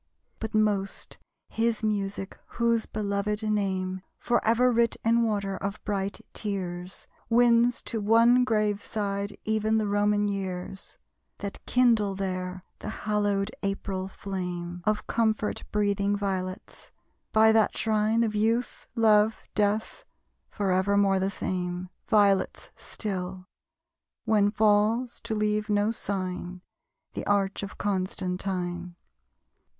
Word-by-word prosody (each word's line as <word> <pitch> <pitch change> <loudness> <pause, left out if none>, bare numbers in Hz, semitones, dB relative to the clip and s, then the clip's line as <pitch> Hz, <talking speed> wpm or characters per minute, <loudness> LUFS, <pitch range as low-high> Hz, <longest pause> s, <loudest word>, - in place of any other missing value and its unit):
But 220 0 -4
most, 205 -2 0 0.3
his 230 -1 0
music 200 -2 -2 0.2
whose 235 -1 +2
belovèd 210 +1 -2
name 190 -3 -1 0.2
Forever 240 +1 +2
writ 235 -1 +2
in 230 +1 +4
water 200 -4 0
of 200 +2 -4
bright 200 -1 -2
tears, 185 -3 -4 0.2
Wins 235 0 +4
to 225 - -3
one 230 +4 +5
grave 210 -4 +1
side 200 -1 -3
even 220 0 +1
the 215 - +1
Roman 205 0 +2
years, 190 -1 -5 0.4
That 200 -1 -6
kindle 230 -6 +3
there 185 -1 -3 0.2
the - - -5 0.2
hallowed 205 -1 +1
April 195 -1 -2
flame 180 -3 -5
Of 215 0 0
comfort 220 -2 0
breathing 205 -1 +1
violets. 190 0 -4 0.4
By 220 0 +6
that 220 -1 +3
shrine 220 +1 +2
Of 220 -2 -1
Youth, 225 +3 0
Love, 220 -1 +4
Death, 210 +1 0 0.5
forevermore 195 0 +2
the 190 +1 +1
same, 180 -2 -3 0.2
Violets 200 -3 +2
still! 185 -3 -5 0.8
When 205 -2 +4
falls, 215 +3 +2
to 220 - -2
leave 210 0 0
no 205 +1 +2
sign, 185 -4 -4 0.5
The - - -4
arch 200 -1 +1
of 200 0 -7
Constantine. 185 -2 -2
205 Hz, 115 wpm, -27 LUFS, 195-220 Hz, 0.8 s, By